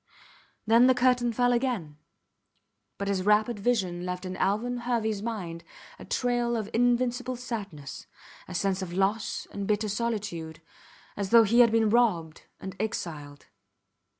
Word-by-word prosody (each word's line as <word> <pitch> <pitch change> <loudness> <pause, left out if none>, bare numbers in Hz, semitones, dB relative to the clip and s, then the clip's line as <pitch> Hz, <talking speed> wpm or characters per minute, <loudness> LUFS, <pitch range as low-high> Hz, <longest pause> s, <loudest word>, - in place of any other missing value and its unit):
Then 230 +3 +6
the 260 - +5
curtain 250 -1 +2
fell 245 +2 +2
again, 230 - -2 1.0
but 200 - -3
his 195 -2 0
rapid 210 +3 +2
vision 195 -6 0
left 180 +1 -4
in 185 0 -5
Alvan 235 +5 0
Herveys 225 -4 -1
mind 185 -7 -5 0.4
a - - -10
trail 240 -1 0
of 215 -2 -4
invincible 245 +1 +1
sadness, 205 - -7 0.4
a 185 - -7
sense 195 +1 0
of 175 -2 -5
loss 195 +4 -1
and 200 -1 -5
bitter 210 0 0
solitude, 200 -8 -3 0.6
as 200 -2 -3
though 230 +1 +7
he 225 +3 +3
had 235 -2 +7
been 220 -2 +3
robbed 180 -10 +1
and 190 -1 -7
exiled. 150 -9 -5
215 Hz, 145 wpm, -27 LUFS, 185-240 Hz, 1.0 s, though